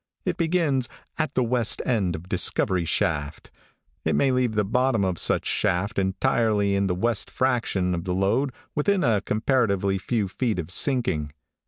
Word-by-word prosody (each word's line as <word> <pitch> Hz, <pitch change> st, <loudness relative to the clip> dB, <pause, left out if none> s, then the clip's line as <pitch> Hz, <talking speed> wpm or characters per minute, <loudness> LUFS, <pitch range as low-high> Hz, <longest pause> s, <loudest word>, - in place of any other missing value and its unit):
It -, -, 0 dB
begins 160 Hz, -7 st, 0 dB, 0.3 s
'at 155 Hz, -3 st, -1 dB
the 130 Hz, -, +2 dB
west 120 Hz, -1 st, +1 dB
end 100 Hz, -9 st, 0 dB
of 80 Hz, +3 st, -9 dB
discovery 90 Hz, -1 st, +1 dB
shaft,' 75 Hz, -2 st, -1 dB, 0.5 s
it -, -, +1 dB
may 135 Hz, -1 st, +3 dB
leave 125 Hz, -3 st, 0 dB
the 105 Hz, -, +2 dB
bottom 115 Hz, 0 st, +1 dB
of 90 Hz, -3 st, -1 dB
such -, -, +2 dB
shaft 100 Hz, +5 st, 0 dB
entirely 105 Hz, 0 st, +1 dB
in 100 Hz, 0 st, +1 dB
the 90 Hz, -, 0 dB
west 115 Hz, +3 st, 0 dB
fraction 115 Hz, -8 st, 0 dB
of 85 Hz, -1 st, -3 dB
the 90 Hz, -1 st, -1 dB
lode 115 Hz, +9 st, +1 dB, 0.2 s
within 185 Hz, +6 st, +1 dB
a 110 Hz, -4 st, +2 dB
comparatively 105 Hz, -4 st, 0 dB
few 110 Hz, 0 st, -1 dB
feet 110 Hz, +2 st, -2 dB
of 90 Hz, -1 st, -5 dB
sinking. 90 Hz, -, 0 dB
105 Hz, 165 wpm, -24 LUFS, 95-125 Hz, 0.5 s, may